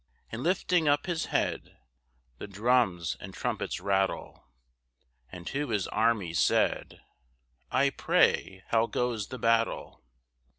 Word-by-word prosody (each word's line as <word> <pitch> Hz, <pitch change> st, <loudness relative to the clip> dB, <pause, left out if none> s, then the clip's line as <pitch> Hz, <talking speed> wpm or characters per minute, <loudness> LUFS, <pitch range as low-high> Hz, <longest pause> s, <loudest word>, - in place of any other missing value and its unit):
And 115 Hz, -, -5 dB
lifting 175 Hz, 0 st, +1 dB
up 145 Hz, 0 st, +2 dB
his 170 Hz, -3 st, -2 dB
head -, -, -2 dB, 0.6 s
(The -, -, -6 dB
drums 100 Hz, -5 st, +1 dB
and -, -, -9 dB
trumpets -, -, -3 dB
rattle), 95 Hz, 0 st, -1 dB, 0.8 s
And 90 Hz, -1 st, -9 dB
to 140 Hz, +4 st, -3 dB
his 105 Hz, -4 st, 0 dB
army 110 Hz, -6 st, +1 dB
said, -, -, +1 dB, 0.7 s
"I 140 Hz, +2 st, +2 dB
pray 95 Hz, -7 st, +1 dB
how 115 Hz, 0 st, +3 dB
goes 115 Hz, -5 st, -2 dB
the 130 Hz, -, -7 dB
battle?" 115 Hz, -1 st, 0 dB
115 Hz, 120 wpm, -29 LUFS, 100-135 Hz, 0.8 s, how